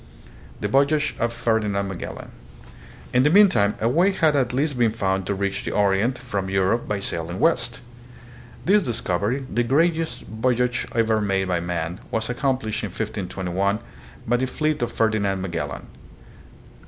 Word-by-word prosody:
The 105 - 0
Voyage 140 +6 +2
of 115 0 +1
Ferdinand 110 -4 0
Magellan. 95 -2 -7 0.8
In 125 - +5
the 145 - +4
mean 200 +4 +7
time 100 - +2
a 110 - +1
way 170 +11 +3
had 160 -5 +2
at 130 -4 +1
last 140 +3 0
been 120 -2 +4
found 95 -4 -1
to 100 - 0
reach 100 0 -2
the - - -3
Orient 105 +5 +2
from 100 -7 -3
Europe 95 +5 +1
by 105 - -1
sailing 85 -1 -4
west. 125 -7 +1 0.8
This 205 +3 +5
discovery, 115 - -1
the 120 - 0
greatest 160 +6 +1
voy 120 +3 0
age 125 -1 0
ever 110 -2 +2
made 95 -2 0
by 90 -1 +1
man, 85 +1 -3
was 115 +1 -2
accomplished, 125 -4 -1
in - - -1
1521, 100 -1 -2 0.5
by 120 +2 +2
the 130 +1 0
fleet 155 +2 -1
of 120 -1 -1
Ferdinand 105 -4 +1
Magellan. 85 -6 -4
110 Hz, 160 wpm, -23 LUFS, 95-130 Hz, 0.8 s, mean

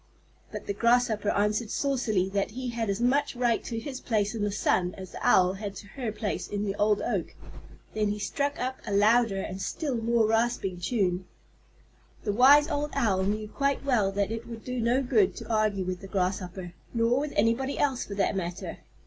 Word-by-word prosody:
But - - -6
the 200 - -2
Grasshopper 230 -2 +2
answered 210 +2 +1
saucily 235 -10 0
that 200 0 -1
he 255 -1 -3
had 230 -2 -2
as 200 +1 -1
much 260 +3 +1
right 240 -2 +1
to 230 - -4
his 260 +2 -5
place 210 -2 0
in 220 -3 -2
the 205 - +1
sun 180 -2 +1
as 185 -2 -8
the - - -8
Owl 185 0 +4
had 200 0 -6
to 205 - -10
her 240 -1 -4
place 210 -1 -3
in 205 0 -2
the 195 - -1
old 210 0 +2
oak. - - -2 0.6
Then 215 -1 +1
he 205 +1 -1
struck 285 +7 -2
up 260 +1 -2
a - - -3
louder 210 0 +4
and 190 0 -5
still 285 +2 -2
more 230 0 +2
rasping 225 -5 0
tune. 185 -2 0 1.0
The 205 - -1
wise 280 +6 +7
old 295 -2 -1
Owl 190 -4 +2
knew 215 +2 -1
quite 275 +4 -1
well 220 -8 +2
that 200 +1 0
it 225 +1 -5
would 230 -1 -8
do 250 -1 -2
no 245 +4 +2
good 375 - +2
to - - -5
argue 210 -3 +1
with 180 0 -4
the 195 - -8
Grasshopper, 185 -2 -2 0.2
nor 230 +2 +3
with 295 0 -3
anybody 230 +6 +1
else 270 -4 +1
for 200 - -7
that 200 0 +1
matter. 180 -1 -4
215 Hz, 200 wpm, -28 LUFS, 200-245 Hz, 1.0 s, wise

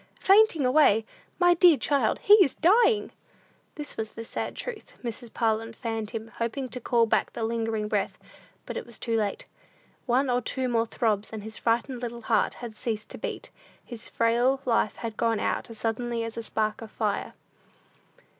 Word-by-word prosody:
"Fainting 390 -7 +5
away! 250 -5 +4 0.3
My 355 -1 +5
dear 345 -3 +6
child, 275 -7 +1
he 410 - +7
is 275 - -2
dying!" 430 +5 +3 0.6
This 295 -1 -6
was 220 -1 -4
the 230 - -7
sad - - -4
truth. 475 -4 -6
Mrs. 235 0 -5
Parlin 225 0 0
fanned 225 -2 -4
him, 225 -1 -6
hoping 250 +3 -2
to 250 +2 -5
call 235 0 +3
back 225 - +1
the 230 - -4
lingering 225 -1 -1
breath. - - -1 0.5
But - - -5
it - - -5
was 235 - -8
too 230 -1 -2
late. 210 -3 -1 0.6
One 255 +3 +2
or 245 0 +1
two 260 +2 -2
more 230 -2 +1
throbs, 215 -3 -1
and 220 -2 -6
his 220 0 -7
frightened 240 +2 0
little 235 -1 -5
heart 220 -1 +1
had 240 -2 -8
ceased 215 -2 -4
to - - -8
beat; - - -5 0.3
his 235 -2 -8
frail 240 +4 +2
life 230 -3 +1
had 225 -2 -6
gone 225 -2 +1
out - - -2
as 230 - -10
suddenly 230 +1 -2
as 230 0 -5
a 230 - -3
spark 215 -1 -1
of 225 - -8
fire. 210 -2 -2
230 Hz, 185 wpm, -27 LUFS, 220-255 Hz, 0.6 s, he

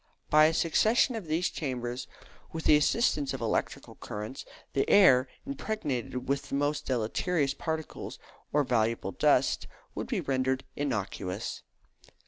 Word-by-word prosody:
By 155 0 +7
a 160 - +3
succession 220 +10 +3
of 210 -7 -6
these 165 +4 0
chambers, 125 -4 -4 0.4
with 160 0 -5
the 150 - +6
assistance 150 - +2
of - - -6
electric - - -1
currents, 105 +5 -6 0.3
the 135 - +1
air, 135 -11 +6 0.2
impregnated 150 - -3
with 140 +1 -1
the - - -2
most 145 +1 -1
deleterious 135 +5 0
particles, 160 +1 -5 0.3
or 150 0 +3
valuable 115 -5 0
dust, - - +2 0.3
could - - -4
be - - -1
rendered 130 0 0
innocuous. 105 -7 -3
140 Hz, 130 wpm, -29 LUFS, 125-160 Hz, 0.4 s, By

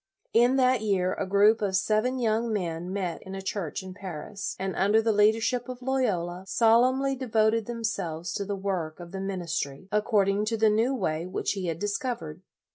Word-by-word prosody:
In 240 +3 +5
that 255 -3 +3
year 190 -4 +1
a 195 - -3
group 205 +3 +4
of 195 -2 0
seven 215 +6 +1
young 230 -1 0
men 175 -3 -3
met 190 -3 -3
in 190 0 -8
a 195 - -5
church 190 -3 -3
in 185 0 -8
Paris, 190 +1 -6
and 190 0 -3
under 205 +3 +3
the 225 0 +2
leadership 225 +4 +2
of 250 0 -7
Loyola, 190 -10 -1
solemnly 255 +6 +3
de 260 0 -6
voted 220 0 +2
themselves 190 -8 -3
to 200 - -2
the 200 0 -3
work 185 -5 -3
of 170 -1 -9
the 190 0 -5
min 195 -1 -3
istry, 160 -1 -4
according 210 -1 +2
to 225 +1 -1
the 220 0 +4
new 230 +5 +2
way 160 -7 -2
which 185 - -2
he 190 -3 -3
had 165 -1 -2
discovered. 200 - -3
205 Hz, 195 wpm, -27 LUFS, 185-225 Hz, -, In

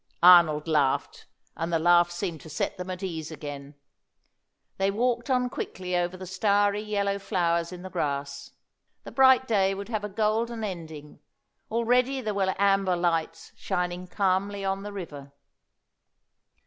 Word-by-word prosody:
Arnold 170 -4 +7
laughed, 145 -4 0 0.3
and 165 +1 -3
the 165 - +3
laugh 175 +1 +4
seemed 175 -2 -4
to 160 - -12
set 150 - -2
them 180 0 -7
at 185 +1 -5
ease 160 -5 -4
again. 145 -2 -8 1.0
They 195 0 +1
walked 240 +4 0
on 250 -1 +2
quickly 185 -6 -4
over 175 +1 -1
the 185 - -8
starry 205 +2 +1
yellow 200 -2 -1
flowers 170 -3 0
in 180 0 -9
the 185 - -7
grass. 140 -2 -3 0.5
The - - -9
bright 260 -1 +5
day 195 -3 +2
would 200 +2 -7
have 215 -3 -2
a 210 - -3
golden 220 +3 -1
ending; 160 -7 -7 0.5
already 245 +4 +1
there 215 -4 -3
were 190 -1 0
amber 195 -2 +2
lights 165 -1 -1
shining 180 0 -3
calmly 195 +1 0
on 195 0 -1
the 205 +1 -7
river. 145 -8 -8
185 Hz, 150 wpm, -27 LUFS, 170-205 Hz, 1.0 s, Arnold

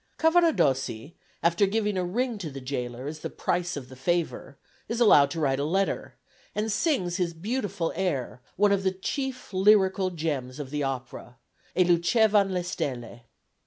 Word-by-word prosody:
Cavaradossi, 175 - +2 0.3
after 170 +4 +3
giving 210 0 0
a 185 - 0
ring 230 +5 -1
to 170 -5 -5
the 135 -1 -7
gaoler 125 -1 -4
as 155 +2 -5
the - - -5
price 175 -2 -2
of 130 -3 -7
the 130 - -12
favour, 160 0 -2 0.3
is 230 +1 -2
allowed 150 -12 +6
to 165 - -4
write 135 -3 +1
a - - 0
letter, 190 +6 -1 0.4
and 215 +1 -1
sings 215 - 0
his 170 -2 -1
beautiful 200 -2 -2
air, 145 -9 -2
one 205 +2 +3
of 200 -1 +2
the 190 -1 +1
chief 260 +5 -4
lyrical 190 -1 +4
gems 150 -6 -3
of 140 -2 -6
the 150 0 -2
opera, 130 -2 -5 0.4
"E 185 - +6
luce 170 -1 +2
van 215 -3 +4 0.2
stelle." 120 -8 -4
175 Hz, 165 wpm, -27 LUFS, 140-205 Hz, 0.4 s, allowed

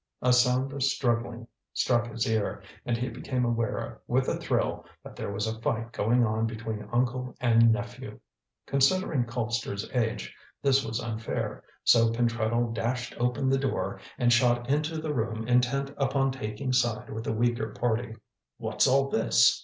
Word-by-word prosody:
A 125 0 +5
sound 125 +2 +3
of 140 - -5
struggling 120 -3 0 0.3
struck 120 -1 +2
his 115 0 -2
ear, 110 -2 -1 0.2
and 120 -1 +1
he 125 +2 -2
became 125 +1 -2
aware 115 -2 -2
with - - +1
a - - +1
thrill - - -1 0.2
that - - -11
there - - -4
was 100 +2 -2
a 110 0 -4
fight 115 0 -1
going 120 +3 +2
on 110 +1 0
between 110 -2 -5
uncle 125 +1 0
and 115 -2 +5
nephew. 120 0 -4 0.5
Considering 140 -1 +2
Colpster's 115 -3 -3
age 115 -3 -1 0.2
this 135 -1 +3
was 110 +1 -3
unfair, 115 -1 -4 0.2
so 115 -1 +5
Pentreddle 115 0 0
dashed 120 +2 -2
open 125 +2 0
the 135 0 +3
door 135 -1 -2 0.2
and 120 -1 +4
shot 120 0 +3
into 155 +2 0
the 155 -1 -2
room 115 -2 -2
intent 125 +3 +2
upon 135 -1 +1
taking 130 +1 -3
side 120 -3 0
with 110 +1 -5
the - - 0
weaker 120 0 0
party. 120 -1 -1 0.4
"What's - - +1
all 135 +1 +3
this?" 110 - +4
120 Hz, 160 wpm, -28 LUFS, 115-130 Hz, 0.5 s, A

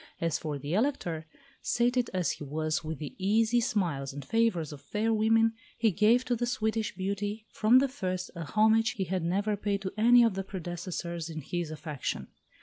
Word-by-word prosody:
As 165 -2 0
for 150 -2 -3
the 145 +3 -4
Elector, 180 - -1 0.3
sated 245 0 +1
as 180 -2 0
he - - -6
was 155 +3 -2
with 160 0 -4
the 150 -1 -6
easy 220 +5 +3
smiles 165 - -1
and 140 -1 -7
favours 200 -9 +1
of 140 - -11
fair 215 +9 0
women, 225 +1 +3 0.2
he 225 -2 +3
gave 220 +7 +4
to 245 - +1
the 240 +1 -1
Swedish 220 -3 -1
beauty, 200 +3 -3
from 225 +4 +5
the 275 +2 +4
first, 185 -9 -4
a 170 - -4
homage 220 +4 +3
he 195 - -2
had 185 +1 -2
never 200 +5 0
paid 200 -1 -2
to 190 - -4
any 240 +2 +7
of 225 -5 +2
her - - 0
predecessors 175 -2 -5
in 160 -1 -5
his 175 +3 -3
affection. 155 -3 -4
195 Hz, 190 wpm, -29 LUFS, 165-225 Hz, 0.3 s, any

